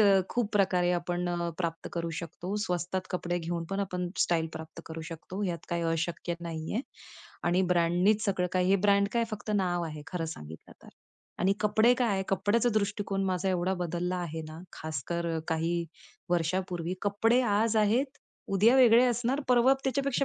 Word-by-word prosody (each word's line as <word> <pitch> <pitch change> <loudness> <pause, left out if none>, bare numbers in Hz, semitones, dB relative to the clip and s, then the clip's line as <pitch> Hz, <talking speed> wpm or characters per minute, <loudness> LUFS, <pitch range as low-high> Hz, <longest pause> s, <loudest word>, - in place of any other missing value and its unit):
अ, 200 -2 +6
खूप 240 -4 -1
प्रकारे 185 -3 +3
आपण 175 0 -1
अ, 175 -1 -1
प्राप्त 165 -2 -3
करू 170 -1 -2
शकतो. 175 +3 -5
स्वस्तात 180 0 -1
कपडे 175 -1 -1
घेऊन 170 0 -3
पण 195 - -1
आपण 180 -2 -2
स्टाईल 165 -2 +2
प्राप्त 160 +1 -8
करू 165 0 -6
शकतो 175 +4 -7
ह्यात 175 -3 -1
काही 170 0 -1
अशक्य 170 +1 -2
नाहीये 165 +5 -3 0.6
आणि 180 +2 +2
ब्रँडनीच 180 +5 +3
सगळं 185 -3 +1
काही 185 0 +2
हे 195 - +6
ब्रँड 200 0 +3
काय 235 -1 +2
फक्त 215 0 -5
नाव 175 -3 +1
आहे 155 -2 -6
खरं 180 -3 -3
सांगितलं 75 +2 -11
तर. - - -14 0.5
आणि 190 +2 +3
कपडे 220 +3 +4
काय 205 -6 +1
कपड्याचा 205 +5 +2
दृष्टीकोन 200 -2 0
माझा 190 0 0
एवढा 185 0 +1
बदलला 180 0 -2
आहे 165 -3 -4
ना, 155 - -9
खासकर 160 +3 -4
अ, - - -1
काही 165 +1 0 0.5
वर्षापूर्वी 175 0 0
कपडे 225 +5 +3
आज 220 0 +2
आहेत, 240 +7 +2 0.3
उद्या 215 +6 +4
वेगळे 245 -1 +7
असणार, 245 +4 0
परवा 250 +2 +5
त्याच्यापेक्षा 275 +1 +1
185 Hz, 165 wpm, -29 LUFS, 170-210 Hz, 0.6 s, वेगळे